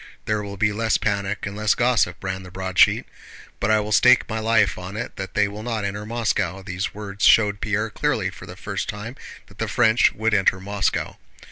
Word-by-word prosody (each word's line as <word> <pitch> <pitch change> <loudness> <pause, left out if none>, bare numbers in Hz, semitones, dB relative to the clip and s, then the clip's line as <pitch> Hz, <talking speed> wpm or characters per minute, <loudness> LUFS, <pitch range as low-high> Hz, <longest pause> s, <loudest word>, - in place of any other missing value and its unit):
"There 105 0 0
will 100 -1 -7
be 105 +1 +1
less 110 +1 +1
panic 100 -1 -2
and 100 0 -5
less 105 0 +1
gossip," 120 -9 +1
ran 95 0 -3
the 90 - -11
broadsheet 95 0 +2 0.5
"but 100 - 0
I 110 0 +4
will 105 0 -4
stake 125 +4 +5
my 110 -1 -3
life 110 -2 +2
on 90 +3 -7
it 120 - -5
that 95 -1 -6
that 105 - +3
scoundrel 100 0 -2
will - - -6
not 110 -2 -3
enter 105 +1 -4
Moscow." 105 -5 -1
These 95 0 -4
words 105 0 -6
showed 105 -2 +5
Pierre 105 +1 -1
clearly - - -1
for - - -12
the - - -9
first - - -4
time 105 +5 -6 0.3
that - - -20
the - - -1
French 115 -1 +3
would 110 +1 -1
enter 95 -2 +3
Moscow. 100 0 -2
105 Hz, 215 wpm, -23 LUFS, 100-110 Hz, 0.5 s, stake